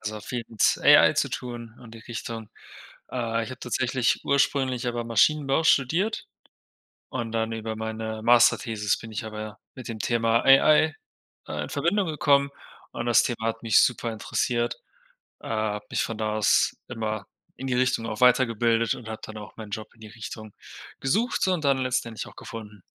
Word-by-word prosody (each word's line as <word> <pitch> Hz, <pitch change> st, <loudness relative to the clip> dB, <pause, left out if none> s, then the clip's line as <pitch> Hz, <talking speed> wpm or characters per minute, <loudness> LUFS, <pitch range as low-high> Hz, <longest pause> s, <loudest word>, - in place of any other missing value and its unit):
Also 110 Hz, 0 st, -5 dB
viel 120 Hz, +3 st, -4 dB
mit 110 Hz, -3 st, +2 dB
AI -, -, +7 dB
zu -, -, +1 dB
tun 120 Hz, -2 st, -6 dB
und 115 Hz, -2 st, -13 dB
die -, -, -10 dB
Richtung. 115 Hz, -1 st, -7 dB, 0.6 s
Äh, 115 Hz, -2 st, -1 dB
ich -, -, -8 dB
habe 130 Hz, -, -8 dB
tatsächlich 125 Hz, 0 st, 0 dB
ursprünglich 135 Hz, -3 st, +1 dB
aber 120 Hz, -1 st, -2 dB
Maschinenbau 135 Hz, +6 st, +2 dB
studiert. 165 Hz, -, +2 dB, 0.8 s
Und 115 Hz, -1 st, -4 dB
dann 115 Hz, 0 st, -1 dB
über 110 Hz, 0 st, -4 dB
meine 110 Hz, 0 st, -4 dB
Masterthesis 115 Hz, -3 st, +3 dB
bin 110 Hz, -, -10 dB
ich 110 Hz, +1 st, -4 dB
aber 110 Hz, -1 st, -7 dB, 0.2 s
mit 130 Hz, -, -9 dB
dem 110 Hz, -2 st, -6 dB
Thema 115 Hz, 0 st, +2 dB
AI, 150 Hz, +3 st, +5 dB, 0.5 s
äh, 75 Hz, 0 st, -3 dB
in -, -, -7 dB
Verbindung 170 Hz, +7 st, 0 dB
gekommen 140 Hz, -3 st, +2 dB, 0.4 s
und -, -, -5 dB
das 120 Hz, -2 st, +5 dB
Thema 115 Hz, -2 st, -2 dB
hat 115 Hz, 0 st, -3 dB
mich 110 Hz, -, +5 dB
super 120 Hz, -1 st, +1 dB
interessiert, 120 Hz, +2 st, -1 dB, 0.6 s
äh, -, -, -9 dB
habe 105 Hz, -1 st, -2 dB
mich -, -, 0 dB
von 115 Hz, -2 st, -4 dB
da 110 Hz, -1 st, -1 dB
aus 105 Hz, -, +3 dB
immer 110 Hz, -2 st, -4 dB, 0.3 s
in 135 Hz, -, -6 dB
die 125 Hz, -, 0 dB
Richtung 125 Hz, -2 st, +1 dB
auch 110 Hz, -2 st, -5 dB
weitergebildet 115 Hz, -2 st, +3 dB
und 115 Hz, -3 st, -10 dB
habe 110 Hz, -, -6 dB
dann 110 Hz, -1 st, -8 dB
auch 105 Hz, -, -11 dB
meinen 110 Hz, -2 st, -9 dB
Job 110 Hz, +2 st, -6 dB
in 115 Hz, -, -24 dB
die 110 Hz, -, -10 dB
Richtung 110 Hz, -1 st, -9 dB, 0.5 s
gesucht 230 Hz, -, +1 dB
und 180 Hz, -5 st, 0 dB
dann 135 Hz, -1 st, +3 dB
letztendlich 125 Hz, -3 st, -2 dB
auch -, -, -14 dB
gefunden. 105 Hz, -3 st, -9 dB
115 Hz, 175 wpm, -26 LUFS, 110-130 Hz, 0.8 s, AI